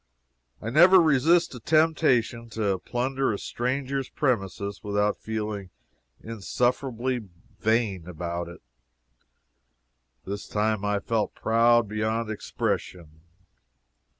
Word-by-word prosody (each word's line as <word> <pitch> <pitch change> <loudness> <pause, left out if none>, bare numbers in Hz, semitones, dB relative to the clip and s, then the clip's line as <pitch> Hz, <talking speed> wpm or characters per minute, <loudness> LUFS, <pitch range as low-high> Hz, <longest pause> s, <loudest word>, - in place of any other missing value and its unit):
I 110 - -5
never 180 +7 +7
resist 160 +2 +3
a 125 - -8
temptation 130 -6 +2
to 100 -4 0
plunder 130 +2 -1
a 100 - -2
stranger's 130 +4 -2
premises 100 -6 -2
without 105 0 0
feeling 105 -3 -4 0.5
insufferably 120 +1 -2 0.3
vain 110 -6 0
about 85 0 -4
it. 85 -5 -12 1.6
This 100 +2 -5
time 105 -1 0
I 105 -1 0
felt 110 -1 -1
proud 115 0 +3
beyond 110 +1 -2
expression. 85 -6 -4
110 Hz, 95 wpm, -26 LUFS, 100-130 Hz, 1.6 s, never